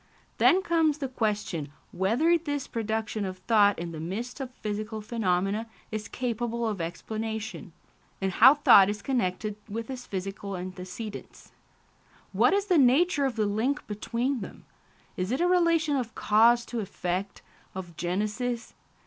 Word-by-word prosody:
Then 380 +1 +5
comes 325 -4 +2
the 280 -3 -3
question 210 - -2 0.2
whether 240 - +2
this 290 -4 -2
production 220 -1 -2
of 185 -1 -4
thought 205 +1 +3
in 170 0 -5
the 160 - -7
midst 215 - -5
of 265 -2 -4
physical 215 -2 -5
phenomena 210 -1 -1 0.2
is 215 -1 -4
capable 235 -1 -2
of 205 -5 -2
explanation, 220 +3 -5 0.5
and 195 -1 -1
how 255 +10 +7
thought 200 -9 +7
is 205 0 -4
connected 210 -4 -1
with 230 +4 -5
its 250 -1 -7
physical 195 0 -5
antecedents. 185 +4 -8 0.8
What - - +4
is 400 0 +1
the 360 -6 +3
nature 280 +3 +4
of 260 -4 -1
the 215 -2 +1
link 225 +8 -1
between 235 +5 -2
them? 200 - -9 0.5
Is 185 +3 -2
it 260 - 0
a 350 - +3
relation 335 -4 +3
of 245 -4 -3
cause 235 +3 +4
to 240 - -4
effect, 190 -1 -4 0.3
of 175 -3 -7
genesis? 215 +8 -2
220 Hz, 150 wpm, -27 LUFS, 195-255 Hz, 0.8 s, how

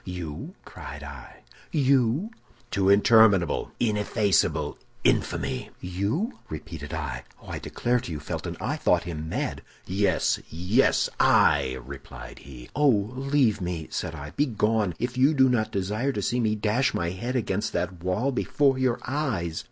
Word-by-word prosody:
"'You?' 90 -5 -6
cried 75 0 -9
I. 70 -3 -11 0.3
'You?' 140 - +2 0.4
"'To 95 -1 +2
interminable, 100 -4 +5
ineffaceable 105 -3 +1 0.2
infamy!' 65 - 0
"'You?' 100 - -2
repeated 75 -1 -7
I. 75 -4 -4 0.2
Oh, - - -14
I - - -4
declare 120 +1 0
to 120 - -7
you, 75 - -4
Felton, 75 - -5
I - - -2
thought - - +2
him 80 -2 -5
mad! - - -2 0.2
"'Yes, 100 +2 +1
yes, 90 +11 +2
I!' 65 0 +4
replied 70 0 -10
he. 60 -3 -11
"'Oh, 150 0 +4 0.3
leave 135 -6 +2
me!' 85 -3 -4
said 80 - -3
I. 75 0 -8
'Begone, 110 - +1
if 125 +1 -3
you 140 +4 +5
do 130 -1 +6
not 120 -4 +1
desire 105 +8 -1
to - - -2
see 125 - 0
me 110 -2 +1
dash 110 +5 +1
my 85 0 -1
head 120 +8 -4
against 110 -3 -1
that 90 -2 -3
wall 105 +9 0
before 135 +1 +1
your 130 -2 +1
eyes! 110 - -2
105 Hz, 150 wpm, -26 LUFS, 85-125 Hz, 0.4 s, do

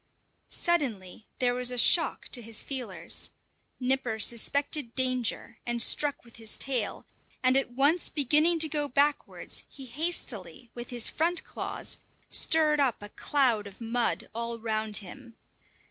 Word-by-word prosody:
Suddenly 225 - -1
there 245 -1 +2
was 250 0 +3
a 250 - -1
shock 330 +7 +3
to 245 - +4
his 225 -1 -4
feelers. 260 -4 -2 0.5
Nipper 255 -3 +1
suspected 240 +4 +1
danger, 255 -3 0
and 240 0 -2
struck 285 +3 +1
with 235 - -16
his 225 -2 0
tail; 250 -6 -2 0.4
and 255 0 +5
at 270 -1 +2
once 285 +7 +3
beginning 305 +4 +2
to 320 - +6
go 295 -1 -1
backwards, 285 +2 0
he 270 - -10
hastily, 240 - -4
with 240 0 -8
his 240 -2 0
front 340 +3 +1
claws, - - -5 0.3
stirred 310 -2 +3
up 255 -7 +1
a 205 - -8
cloud 240 -5 +1
of 200 - -13
mud 235 +1 -1
all 235 +1 -3
round 220 -2 -1
him. 225 +5 -12
250 Hz, 145 wpm, -28 LUFS, 230-285 Hz, 0.5 s, to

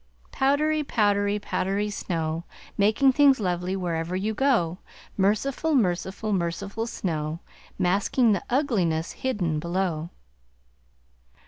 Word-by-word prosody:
Powdery, 300 +3 +2
powdery, 205 -5 +1
powdery 205 0 -1
snow, 165 -4 -3 0.3
Making 215 +7 +4
things 275 -2 +5
lovely 180 -1 -1
wherever 170 -1 -2
you 205 +4 -1
go! 210 -9 +1 0.4
Merciful, 255 +10 +1
merciful, 195 -1 0
merciful 200 +5 -2
snow, 160 -6 -3 0.4
Masking 205 +6 +2
the 195 - +1
ugliness 195 - +1
hidden 180 -12 -1
below. 170 -1 -2
200 Hz, 100 wpm, -25 LUFS, 175-230 Hz, 0.4 s, things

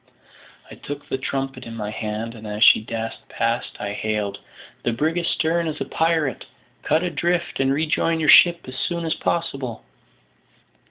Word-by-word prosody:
I - - -7
took 145 0 -8
the 135 - -2
trumpet 135 -1 -3
in 115 -2 -8
my 105 -2 -4
hand, 110 +1 -4
and 110 -2 -10
as 105 +1 0
she - - +8
dashed 115 0 -6
past, 115 +1 -1
I 100 0 -3
hailed, 105 -2 -2 0.4
"The 120 - 0
brig 155 +8 0
astern 170 0 0
is 155 -1 -4
a - - -2
pirate; 160 -6 0 0.4
cut 155 +3 +1
adrift 175 +1 -1
and 135 0 +2
rejoin 160 +3 +1
your 155 - 0
ship 170 +3 +8
as 130 - -7
soon 170 -1 -1
as 160 - +1
possible." 135 - -3
135 Hz, 165 wpm, -23 LUFS, 115-160 Hz, 0.4 s, she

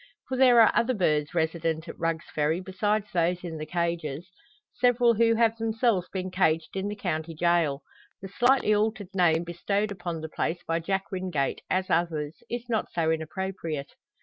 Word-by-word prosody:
For 260 - -1
there 250 -2 +6
are 220 - +6
other 250 +2 +2
birds 150 -5 +1
resident 160 0 -1
at - - -9
Rugg's 165 -1 -1
Ferry 155 +3 +1
besides 205 +3 -1
those 175 +1 +1
in 165 -3 -5
the 155 - -5
cages 170 -1 -3 0.4
several 245 -1 +3
who 230 +1 +3
have 225 -1 +3
themselves 225 -4 0
been 185 -1 -4
caged 160 -3 +1
in 195 +1 -2
the 205 - -4
county 165 -5 -3
gaol. 165 -4 +1 0.4
The 195 - -7
slightly 245 +1 +3
altered 210 -2 -1
name 170 -3 +3
bestowed 200 +5 -1
upon 175 -4 -5
the 160 - -6
place 165 +2 -2
by 165 0 -1
Jack 195 +3 -2
Wingate, 180 -7 -2
as 185 0 0
others, 160 -3 -1
is 240 0 -4
not 225 -3 -1
so 160 -2 +1
inappropriate. 160 -2 -4
180 Hz, 175 wpm, -27 LUFS, 160-210 Hz, 0.4 s, there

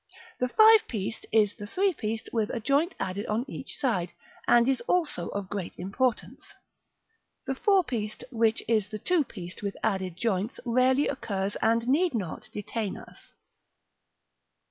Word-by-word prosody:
The 250 - +1
five 440 - +7
pieced 215 -1 -4
is 210 -2 +4
the 205 - -8
three 380 - +1
pieced 220 -3 -4
with 220 -3 +1
a - - -2
joint 285 - +1
added 195 +2 -3
on 220 +4 0
each 265 - -7
side, 180 -10 0 0.3
and 240 0 +5
is 265 -3 +2
also 320 - +1
of 200 -1 -4
great 190 -3 -5
importance. 215 +7 -2 0.9
The 270 - -1
four 385 +7 +3
pieced, 220 -7 -4
which 225 -2 +1
is 215 -3 +2
the 215 - -5
two 345 - +2
pieced 185 -8 -9
with 200 -1 -4
added 190 -5 -1
joints, 210 +1 -1
rarely 255 +4 +3
occurs, 200 -7 -2
and 230 +1 +1
need 310 +3 +2
not 185 -8 -4
detain 210 0 -4
us. - - -13
225 Hz, 155 wpm, -28 LUFS, 200-260 Hz, 0.9 s, five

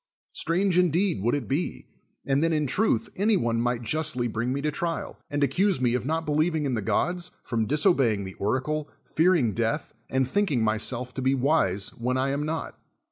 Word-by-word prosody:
Strange 180 +1 +1
indeed 180 - +2
would 120 +7 +1
it 145 - -3
be, 145 +6 -2 0.4
and 140 +2 +2
then 165 - +2
in 155 -2 +1
truth 140 - +1
any 205 +2 +3
one 115 -4 0
might 120 0 -1
justly 145 -1 -1
bring 115 +2 -2
me 135 - -1
to 150 +1 -1
trial, 165 +2 -4
and 145 0 0
ac 135 - +2
cuse 195 -3 +2
me 125 -2 +2
of 125 +1 -1
not 160 +1 -1
believing 155 +1 +1
in 135 - 0
the 110 - -1
gods, 175 - 0
from 115 -3 -1
diso 155 +5 +3
b(\ving 110 -7 +1
the 95 - -7
oracle, 145 +8 -1 0.2
fearing 160 - +2
death, 115 +1 -1 0.2
and 130 -1 +1
thinking 145 - +1
myself 120 +3 0
to 130 - -4
be 130 +1 +2
wise 125 - +1
when 125 +2 -2
I 130 +1 +1
am 145 +2 -1
not. 160 0 -4
140 Hz, 200 wpm, -26 LUFS, 120-160 Hz, 0.4 s, any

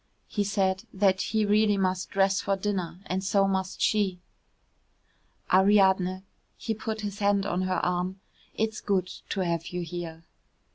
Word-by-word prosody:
He 205 - -1
said 190 -2 0 0.4
he 220 +1 0
really 210 0 +3
must 185 -1 0
dress 195 0 +2
for 200 - 0
dinner, 190 -3 -3
and 190 +1 -2
so 195 0 +3
must 190 -1 -2
she. 200 -4 +2 1.3
"Ariadne," 190 -1 +4 0.3
he 225 - -2
put 220 0 -4
his 205 -1 -5
hand 200 -1 +2
on 180 -2 -1
her 185 -1 0
arm, 180 +2 -1 0.4
"it's 220 0 -1
good 190 -3 +1 0.2
to 195 - -1
have 170 -2 -1
you 180 0 -4
here." 165 -1 -6
190 Hz, 145 wpm, -27 LUFS, 185-205 Hz, 1.3 s, Ariadne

